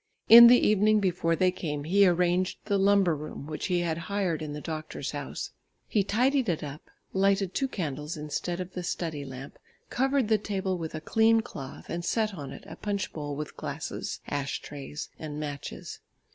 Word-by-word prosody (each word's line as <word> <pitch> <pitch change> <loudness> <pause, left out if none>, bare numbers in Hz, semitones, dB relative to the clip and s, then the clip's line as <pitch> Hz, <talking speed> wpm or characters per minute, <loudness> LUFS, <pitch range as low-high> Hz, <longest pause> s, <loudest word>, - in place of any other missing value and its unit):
In 235 +1 +12
the 245 +1 +8
evening 215 0 +4
before 175 -4 +1
they 185 +1 +3
came, 150 -5 -4
he 195 +5 +5
arranged 180 +1 +2
the 200 -2 +1
lumber 195 -4 +4
room 150 -1 -7
which 155 0 -4
he 180 -2 +1
had 165 -1 -1
hired 190 -6 0
in 155 -1 -4
the 150 - -5
doctor's 155 0 -5
house. - - -5 0.4
He 205 - +2
tidied 250 +4 +2
it 165 -3 -1
up, 145 +1 -8 0.2
lighted 195 -1 +2
two 270 - 0
candles 150 - -4
instead 155 +4 -3
of 185 0 -6
the 180 - -4
study 165 -4 -3
lamp, 135 0 -9 0.3
covered 270 -1 +2
the 220 -1 +3
table 190 -2 -2
with 165 -2 -5
a 155 - -5
clean 225 +5 +4
cloth 135 -10 -9
and 170 0 -4
set 215 +3 0
on 140 -7 -7
it - - -10
a - - -10
punch 200 -2 -3
bowl 145 -2 -4
with 150 0 -6
glass, - - -5
ash 140 -1 -2
trays 145 +1 -7
and 150 -1 -5
matches. 145 -2 -6
175 Hz, 185 wpm, -28 LUFS, 150-200 Hz, 0.4 s, In